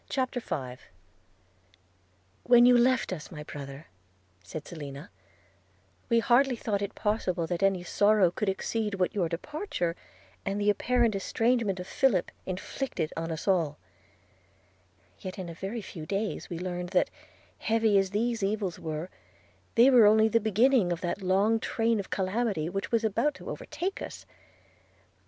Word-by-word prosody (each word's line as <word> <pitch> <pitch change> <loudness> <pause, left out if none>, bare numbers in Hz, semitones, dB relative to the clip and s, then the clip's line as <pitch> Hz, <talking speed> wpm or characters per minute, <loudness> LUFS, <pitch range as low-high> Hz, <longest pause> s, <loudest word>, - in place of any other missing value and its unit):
CHAPTER 260 -2 -1
V 130 - -5 1.6
'WHEN 240 0 +6
you 250 0 +7
left 240 -3 +3
us, 155 -5 -7
my 150 -4 -8
brother,' 140 0 -8 0.6
said 150 +12 -7
Selina, 145 -4 -8 1.0
'we 235 - +4
hardly 250 +2 +4
thought 210 -3 -2
it 200 +1 -4
possible 190 -5 0
that 175 +1 -3
any 195 -2 +2
sorrow 205 -1 +3
could 205 +2 -1
exceed 210 +2 -2
what 185 0 0
your 180 -6 0
departure 180 - -3 0.5
and 195 +1 -2
the 205 0 +4
apparent 240 +2 +1
estrangement 220 0 0
of 180 - -5
Philip 200 -3 +1 0.2
inflicted 185 - -3
on 165 0 -3
us 160 +4 -5
all; 165 -7 +2 1.4
yet 185 +2 -7
in 185 -3 -5
a - - -6
very 195 +6 -5
few 160 -4 -8
days 200 +3 -2
we 175 - -4
learned 180 0 -4
that, 185 -1 +2 0.5
heavy 220 -2 +2
as 195 -1 0
these 225 +3 -1
evils 195 -3 -1
were, 160 +1 -4 0.7
they 245 +4 +7
were 235 -5 +8
only 220 +1 +5
the 230 +1 +3
beginning 220 -1 +3
of 170 0 -2
that 180 +2 -2
long 195 +4 +2
train 225 0 0
of 195 - -5
calamity 190 -4 -1
which 195 +2 -4
was 230 -1 +2
about 225 +8 +1
to - - -7
overtake 380 +3 -4
us. - - -7
200 Hz, 150 wpm, -28 LUFS, 175-230 Hz, 1.6 s, were